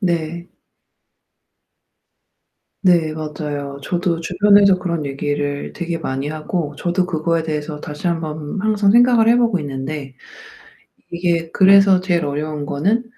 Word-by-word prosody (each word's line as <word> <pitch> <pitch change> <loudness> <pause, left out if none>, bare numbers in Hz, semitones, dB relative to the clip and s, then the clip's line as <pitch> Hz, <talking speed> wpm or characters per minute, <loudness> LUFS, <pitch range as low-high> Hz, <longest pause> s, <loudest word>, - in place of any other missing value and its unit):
네. 170 -2 -2 2.3
네 170 -5 +3
맞아요. 150 -2 -5
저도 175 +1 -1
주변에서 200 +2 +4
그런 170 -4 -3
얘기를 145 +1 -3
되게 170 -1 -4
많이 135 -2 -3
하고 155 0 -4
저도 180 +1 -1
그거에 165 -1 -1
대해서 150 -1 -4
다시 150 +4 -4
한번 155 +1 -4
항상 210 -2 +2
생각을 240 -1 +5
해 235 - +5
보고 230 -8 +2
있는데 135 -1 -6 1.0
이게 170 -1 -1
그래서 195 -1 +6
제일 175 -3 0
어려운 150 +1 -3
거는 195 +12 0
165 Hz, 260 characters per minute, -19 LUFS, 150-185 Hz, 2.3 s, 그래서